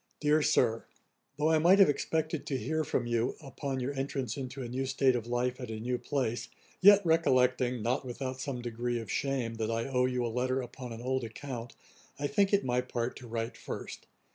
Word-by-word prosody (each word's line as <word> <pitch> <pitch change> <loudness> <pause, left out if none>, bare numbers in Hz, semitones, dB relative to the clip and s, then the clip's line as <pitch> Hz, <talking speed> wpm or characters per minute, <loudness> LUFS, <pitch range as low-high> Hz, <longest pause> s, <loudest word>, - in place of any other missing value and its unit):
'DEAR 150 +1 +3
SIR, 115 -5 +2 0.5
'Though 155 +2 +2
I 160 - +4
might 175 +5 +6
have 195 - +8
expected 160 +2 -1
to 135 - 0
hear 155 +4 -1
from 130 -4 -1
you, 120 +1 0
upon 135 -1 -4
your 130 +3 -2
entrance 135 -3 -2
into 135 0 -5
a - - -4
new 130 +3 -2
state 130 -1 +3
of 115 -1 -3
life 125 +1 -1
at 125 - -6
a 110 -1 -4
new 125 +2 -2
place, 120 -3 -2 0.3
yet 205 0 +8
recollecting, 130 -7 +3
(not 125 +5 0
without 130 +1 -5
some 125 -3 -4
degree 120 0 -2
of 115 - -6
shame,) 130 -4 -1
that 110 -1 -1
I 115 0 -1
owe 125 -2 +2
you 125 -1 -1
a - - 0
letter 130 +1 +1
upon 125 0 -7
an 115 +1 -7
old 130 0 0
account, 120 +1 -6 0.4
I 145 - -3
think 200 +5 +2
it 200 -1 +3
my 125 0 +2
part 120 -1 -3
to 125 - -10
write 115 0 -3
first. - - -7
125 Hz, 210 wpm, -31 LUFS, 120-140 Hz, 0.5 s, have